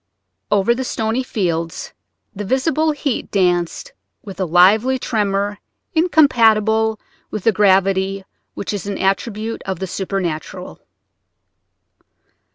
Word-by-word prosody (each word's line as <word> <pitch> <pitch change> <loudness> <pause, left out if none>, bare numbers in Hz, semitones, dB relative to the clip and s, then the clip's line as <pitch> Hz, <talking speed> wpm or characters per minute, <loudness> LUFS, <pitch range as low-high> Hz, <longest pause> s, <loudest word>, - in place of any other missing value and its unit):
Over 205 +3 +3
the 260 +2 -3
stony 225 0 -1
fields 170 -9 -3 0.4
the 205 - -4
visible 305 - +1
heat 290 -4 -3
danced 180 - 0 0.3
with 195 -2 -10
a 190 - 0
lively 200 +10 +4
tremor 205 -4 -1 0.3
incompatible 225 - +3 0.3
with 215 - -5
the 225 - +4
gravity 195 -1 +2 0.3
which 200 - -4
is 200 -1 -4
an 200 - -3
attribute 215 +3 -2
of 190 -1 -3
the 190 - -4
supernatural. 185 -4 -4
205 Hz, 110 wpm, -19 LUFS, 190-235 Hz, 0.4 s, lively